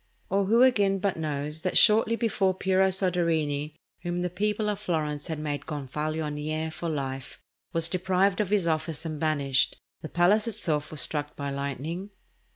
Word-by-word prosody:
Or 195 Hz, 0 st, +2 dB
who, 230 Hz, +5 st, +5 dB
again, 205 Hz, -7 st, +4 dB
but 195 Hz, 0 st, -1 dB
knows 150 Hz, -1 st, -3 dB
that 185 Hz, -, +1 dB
shortly 220 Hz, +2 st, +6 dB
before 200 Hz, -5 st, +1 dB
Piero 190 Hz, 0 st, +2 dB
Soderini, 165 Hz, -6 st, 0 dB, 0.3 s
whom 175 Hz, 0 st, -2 dB
the 180 Hz, -, -2 dB
people 210 Hz, +3 st, -1 dB
of 205 Hz, -1 st, -1 dB
Florence 155 Hz, -6 st, -2 dB
had 160 Hz, -2 st, -3 dB
made 150 Hz, -1 st, -4 dB
gonfalonier 155 Hz, +2 st, -3 dB
for 170 Hz, +1 st, -4 dB
life, 135 Hz, -3 st, -4 dB, 0.3 s
was 165 Hz, 0 st, +2 dB
deprived 185 Hz, +2 st, +1 dB
of 205 Hz, -, -2 dB
his 200 Hz, -4 st, +2 dB
office 160 Hz, 0 st, -1 dB
and 155 Hz, -2 st, -4 dB
banished, 140 Hz, -4 st, +1 dB, 0.2 s
the 155 Hz, -, -7 dB
palace 200 Hz, +6 st, +3 dB
itself 155 Hz, -9 st, -2 dB
was 155 Hz, -3 st, +4 dB
struck 145 Hz, +2 st, -1 dB
by 140 Hz, -1 st, -4 dB
lightning? 140 Hz, +7 st, -4 dB
165 Hz, 160 wpm, -27 LUFS, 150-190 Hz, 0.3 s, shortly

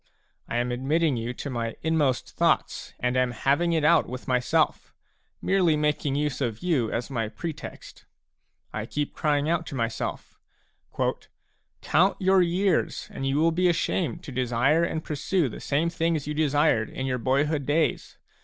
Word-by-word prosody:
I 120 Hz, -, -1 dB
am 120 Hz, +1 st, 0 dB
admitting 145 Hz, +4 st, +1 dB
you 115 Hz, +1 st, -3 dB
to 140 Hz, -, -5 dB
my 115 Hz, -2 st, -3 dB
inmost 150 Hz, -5 st, +1 dB
thoughts, -, -, +1 dB
and 125 Hz, 0 st, 0 dB
am 130 Hz, -1 st, +2 dB
having 145 Hz, +8 st, +1 dB
it 160 Hz, -2 st, +1 dB
out 160 Hz, +1 st, +4 dB
with 125 Hz, +1 st, -7 dB
myself, 125 Hz, -1 st, +1 dB, 0.5 s
merely 180 Hz, -5 st, +3 dB
making 150 Hz, -2 st, 0 dB
use 145 Hz, -1 st, -1 dB
of 115 Hz, -4 st, -2 dB
you 140 Hz, -11 st, +1 dB
as 120 Hz, +4 st, -3 dB
my 115 Hz, -4 st, -1 dB
pretext. 160 Hz, +6 st, -8 dB, 0.7 s
I -, -, -4 dB
keep 145 Hz, -1 st, -3 dB
crying 150 Hz, -2 st, +1 dB
out 165 Hz, 0 st, 0 dB
to 140 Hz, -, -6 dB
myself: 115 Hz, -2 st, -4 dB, 0.7 s
" -, -, -24 dB
Count 190 Hz, +4 st, +3 dB
your 190 Hz, 0 st, +4 dB
years, 180 Hz, +3 st, 0 dB
and 135 Hz, -, -3 dB
you 135 Hz, +1 st, +1 dB
will 165 Hz, +2 st, +3 dB
be 180 Hz, +2 st, +2 dB
ashamed 170 Hz, 0 st, -1 dB
to 140 Hz, -, -8 dB
desire 130 Hz, +5 st, +2 dB
and 160 Hz, -1 st, -2 dB
pursue 155 Hz, +2 st, 0 dB
the 115 Hz, -, -7 dB
same 160 Hz, +4 st, 0 dB
things 165 Hz, -3 st, 0 dB
you 150 Hz, -, -3 dB
desired 145 Hz, -7 st, +2 dB
in 130 Hz, -, -4 dB
your 130 Hz, -1 st, -1 dB
boyhood 140 Hz, +3 st, 0 dB
days. 155 Hz, +2 st, 0 dB
145 Hz, 165 wpm, -26 LUFS, 125-165 Hz, 0.7 s, out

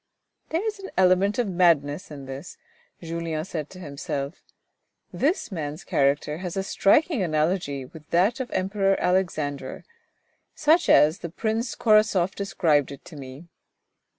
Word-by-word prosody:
" -, -, -48 dB
There 335 Hz, +6 st, -1 dB
is 435 Hz, -2 st, -3 dB
an 390 Hz, -, -8 dB
element 190 Hz, +2 st, +4 dB
of 245 Hz, -3 st, +1 dB
madness 170 Hz, -4 st, +2 dB
in 140 Hz, -3 st, -9 dB
this," 135 Hz, +6 st, -8 dB, 0.5 s
Julien 165 Hz, -1 st, -3 dB
said 155 Hz, -6 st, -5 dB
to 185 Hz, -, -12 dB
himself. 140 Hz, -1 st, -5 dB, 0.7 s
This 305 Hz, -, 0 dB
man's 155 Hz, -2 st, -5 dB
character 145 Hz, +2 st, +1 dB
has 180 Hz, 0 st, -5 dB
a 195 Hz, -, 0 dB
striking 265 Hz, -, +3 dB
analogy 155 Hz, -4 st, 0 dB
with 150 Hz, +3 st, -14 dB
that 195 Hz, +9 st, +2 dB
of 260 Hz, -, -3 dB
the -, -, -2 dB
Emperor 195 Hz, +1 st, +1 dB
Alexander, 155 Hz, -7 st, -1 dB, 0.7 s
such 320 Hz, +3 st, +3 dB
as 155 Hz, +4 st, +5 dB
the 170 Hz, -, -6 dB
Prince 225 Hz, +6 st, -2 dB
Korasoff 215 Hz, -5 st, +3 dB
described 160 Hz, -8 st, +1 dB
it 140 Hz, -, -11 dB
to 165 Hz, -, -12 dB
me. 135 Hz, +3 st, -10 dB
175 Hz, 150 wpm, -25 LUFS, 150-200 Hz, 0.7 s, as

